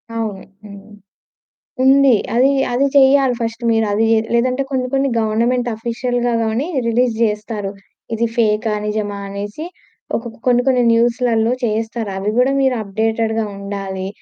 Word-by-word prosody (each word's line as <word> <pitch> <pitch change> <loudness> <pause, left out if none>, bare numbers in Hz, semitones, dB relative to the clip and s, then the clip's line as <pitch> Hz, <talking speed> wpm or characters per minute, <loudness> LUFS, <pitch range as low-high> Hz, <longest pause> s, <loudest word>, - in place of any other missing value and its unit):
అవును 215 -4 -4 0.2
హ్మ్. 200 +1 -12 0.9
ఉంది 275 0 +5 0.2
అది, 260 +3 +4 0.2
అది 255 +3 +2
చెయ్యాలి 270 -1 +5
ఫస్ట్ 230 +1 -4
మీరు 225 -1 +2
అది 220 +2 +2
జే 225 - +4 0.2
లేదంటే 255 +3 +1
కొన్ని 255 -1 -1
కొన్ని 275 0 +1
గవర్నమెంట్ 235 +3 0
ఆఫీషియల్‌గా 240 +2 -2
గానీ 225 +7 -1 0.2
రిలీజ్ 235 0 +1
జేస్తారు. 210 -2 -2 0.4
ఇది 235 +1 0
ఫేకా, 220 -1 +1
నిజమా 210 -1 -2
అనేసి. 205 +9 -6 0.5
ఒకోకా 230 -1 -7
కొన్ని, 245 -1 +4
కొన్ని 250 -2 +3
న్యూస్‌లలో 235 0 +2
చేస్తారు 225 -1 -2
అవి 200 +2 -1
కూడా 260 +2 +3
మీరు 265 -2 +2
అప్డేటెడ్‌గా 220 +2 -1
ఉండాలి. 195 -1 -5
225 Hz, 135 wpm, -18 LUFS, 215-250 Hz, 0.9 s, ఉంది